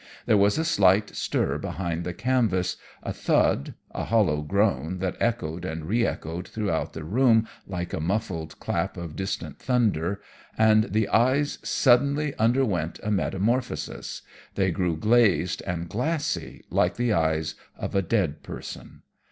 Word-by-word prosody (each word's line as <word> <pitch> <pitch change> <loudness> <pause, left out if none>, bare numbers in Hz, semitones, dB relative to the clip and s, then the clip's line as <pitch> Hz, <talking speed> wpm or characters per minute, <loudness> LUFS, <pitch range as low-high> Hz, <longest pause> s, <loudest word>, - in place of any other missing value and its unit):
There - - +4
was 100 +3 +4
a 160 - 0
slight 100 - +3
stir - - 0
behind 85 -2 -3
the 90 - -3
canvas, 110 -8 +1 0.3
a - - -3
thud, 70 - +1 0.2
a - - -4
hollow 100 -10 +2
groan 95 -1 0
that 90 0 -2
echoed 90 -8 -1
and 80 -3 -4
re 115 +7 +2
echoed 85 +3 -5
throughout 100 -7 -2
the 80 - -6
room 110 - +3 0.2
like 90 -2 -4
the - - -3
muffled 85 -2 -2
clap - - -2
of 85 -3 -6
distant 95 +1 -4
thunder, 100 -8 +1 0.4
and 110 -1 +5
the 110 -2 0
eyes 130 +5 +2
suddenly 140 +3 +3
underwent 110 - +1
a 105 - -1
metamorphosis 100 - -1 0.3
they 95 -2 +2
grew 85 -2 0
glazed 105 -3 +3
and 85 -2 -2
glassy 150 - -2
like - - +2
the 120 -2 +1
eyes 80 -2 +1 0.2
of - - -4
a 100 - +3
dead 90 -6 0
person. - - -9
100 Hz, 145 wpm, -26 LUFS, 85-115 Hz, 0.4 s, and